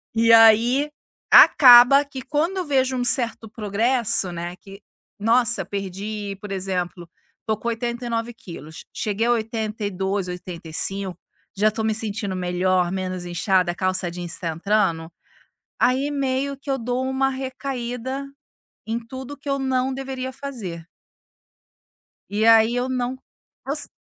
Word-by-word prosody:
E, 230 0 +5
aí, 230 +6 +6 0.4
acaba 250 +1 +9
que 275 -2 -8
quando 305 +8 -1
eu 365 - -2
vejo 260 -3 +1
um 245 - 0
certo 235 -3 0
progresso, 215 -1 0
né, 175 +1 -5
que, 195 +2 -14 0.4
nossa, 225 -2 +2
perdi 200 +2 -5
por 205 - -8
exemplo, 185 -2 -3 0.4
tô 220 - 0
com 225 +3 -7
89 235 0 -3
quilos, 165 -7 -11
cheguei 215 +2 -1
a 240 - +3
82, 210 -4 -2
85, 180 +1 -5 0.4
já 210 +2 +3
tô 220 +1 -4
me 220 0 +1
sentindo 210 -3 -3
melhor, 180 0 0
menos 185 -1 -4
inchada, 175 +1 +1
a - - -9
calça 185 -1 -1
jeans 175 0 -5
tá 170 - -3
entrando, 165 -1 0 0.7
aí 265 +3 +2
meio 275 0 -1
que 280 +1 -5
eu 270 - 0
dou 245 +2 -2
uma 265 0 +1
recaída 260 0 -4 0.6
em 225 +1 -2
tudo 260 +4 -9
que 280 +1 -10
eu 275 - 0
não 265 -1 0
deveria 260 -1 -5
fazer. 215 -13 -7 1.4
E 210 +2 0
aí 225 +1 +6
eu 250 +1 -1
não 255 0 -2 0.5
os 285 +1 -3
225 Hz, 135 wpm, -22 LUFS, 190-260 Hz, 1.4 s, acaba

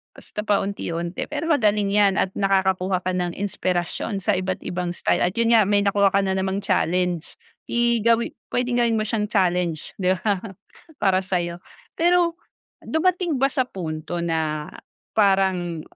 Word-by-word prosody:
basta 210 - -7
paunti-unti. 185 -4 -2
Pero 300 +3 -3
magaling 210 -7 +2
'yan 205 -1 +4
at 190 - +1
nakakakuha 190 -2 +1
ka 185 - 0
ng 175 -1 -2
inspirasyon 185 0 -2
sa 210 -3 +2
iba't 185 0 -3
ibang 180 0 -3
style - - +1
at 180 +1 0
yun 230 0 +2
nga, 225 -2 +6
may 205 -1 +3
nakuha 200 -1 +3
ka 200 - +4
na 190 0 0
namang 190 +1 -1
challenge. 180 -2 0 0.3
I 235 -1 +2
gawi 230 +1 +2 0.2
puwedeng 245 0 0
gawin 230 -1 +2
mo 215 - +1
siyang 215 -1 -1
challenge, 180 -6 0
'di 185 0 +2
ba 205 -4 +1 0.6
para 190 -2 +3
sa'yo. 175 -2 -2 0.4
Pero 345 0 +2 0.4
dumating 345 -1 0
ba 270 +1 +2
sa 260 -2 +1
punto, 170 -2 -5
na 155 -2 -2 0.5
parang, 190 -5 +2
195 Hz, 155 wpm, -23 LUFS, 180-225 Hz, 0.6 s, nga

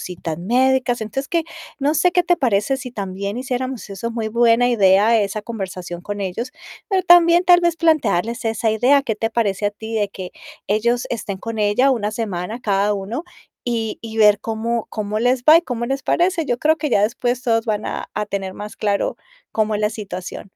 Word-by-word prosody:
citas 170 -3 -5
médicas. 245 +4 +1
Entonces, 270 +6 -4
que, 335 -1 0 0.3
no 285 +2 +1
sé, 360 +3 +3
¿qué 355 0 +2
te 350 0 +2
parece 250 +1 +1
si 255 -2 -7
también 200 0 -4
hiciéramos 255 -1 -4
eso? 195 +4 -4
Muy 225 -2 -3
buena 235 +1 +3
idea 210 +1 +4
esa 205 +1 -2
conversación 185 -6 -6
con 205 +2 -5
ellos, 195 +7 -4 0.4
pero 385 -3 +1
también, 345 0 +6
tal 355 0 +6
vez 345 -1 +1
plantearles 250 - +1
esa 225 0 0
idea, 255 +6 +3
¿qué 225 -6 -2
te 225 +1 -1
parece 205 -3 0
a 205 - +1
ti 220 +2 -8
de 210 -2 0
que 185 -2 -8 0.4
ellos 235 +4 +1
estén 205 -4 -4
con 225 +2 -6
ella 210 +6 +3
una 210 -5 0
semana 215 0 -4
cada 205 -2 +1
uno 205 +9 -4 0.4
y 230 -3 -2
y 225 -1 -8
ver 210 -2 +5
cómo 225 +1 -2
cómo 215 -1 -3
les 245 +1 +1
va 310 +3 +8
y - - -3
cómo 235 -5 -3
les 270 +2 -2
parece? 345 -1 +1
Yo 245 0 -1
creo 315 +1 +3
que 305 -1 -2
ya 200 - +3
después 245 +3 -1
todos 225 -1 +1
van 215 -1 -1
a - - -5
a 210 - -1
tener 195 -2 -4
más 210 +1 -8
claro, 205 -1 -1 0.4
cómo 215 -1 0
es 205 - -1
la 210 0 +1
situación 200 -4 -7
225 Hz, 200 wpm, -20 LUFS, 205-255 Hz, 0.4 s, va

